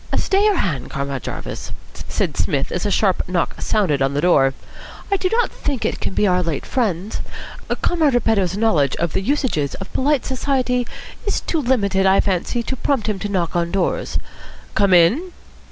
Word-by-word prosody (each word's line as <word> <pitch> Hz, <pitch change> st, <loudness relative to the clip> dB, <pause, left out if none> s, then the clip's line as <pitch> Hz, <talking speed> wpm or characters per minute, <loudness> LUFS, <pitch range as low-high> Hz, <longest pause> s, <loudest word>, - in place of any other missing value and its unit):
"Stay 390 Hz, +1 st, +2 dB
your 420 Hz, -2 st, +4 dB
hand, 155 Hz, -, -1 dB
Comrade 140 Hz, -2 st, -3 dB
Jarvis," -, -, -6 dB, 0.2 s
said -, -, -3 dB, 0.4 s
as 180 Hz, -, -2 dB
a -, -, 0 dB
sharp 195 Hz, -2 st, +2 dB
knock 180 Hz, -2 st, -1 dB
sounded 180 Hz, -11 st, +1 dB
on 135 Hz, +1 st, +1 dB
the 145 Hz, -, +1 dB
door. 135 Hz, -7 st, +4 dB, 0.6 s
"I -, -, +4 dB
do 370 Hz, -1 st, 0 dB
not 475 Hz, +1 st, +2 dB
think 275 Hz, -5 st, -3 dB
it -, -, -1 dB
can -, -, -3 dB
be -, -, +3 dB
our 180 Hz, -2 st, +3 dB
late 165 Hz, -5 st, -2 dB
friends. 210 Hz, -5 st, -1 dB, 0.6 s
Comrade 315 Hz, -7 st, +2 dB
Repetto's 200 Hz, -6 st, +1 dB
knowledge 165 Hz, -, +2 dB
of 170 Hz, -2 st, -2 dB
the -, -, 0 dB
usages 230 Hz, -, 0 dB
of 195 Hz, -, -9 dB
polite 280 Hz, 0 st, +1 dB
society 255 Hz, -2 st, 0 dB, 0.4 s
is 410 Hz, -, 0 dB
too 330 Hz, -, -1 dB
limited, 200 Hz, -7 st, +2 dB
I 190 Hz, +1 st, +5 dB
fancy, 200 Hz, +5 st, 0 dB
to 260 Hz, -, -3 dB
prompt 260 Hz, -2 st, 0 dB
him 210 Hz, -3 st, -1 dB
to 205 Hz, -, -3 dB
knock 175 Hz, -4 st, -1 dB
on 170 Hz, -1 st, +1 dB
doors. 190 Hz, -1 st, -1 dB, 0.6 s
Come 200 Hz, -2 st, +3 dB
in." 250 Hz, -, +3 dB
200 Hz, 180 wpm, -20 LUFS, 170-260 Hz, 0.6 s, I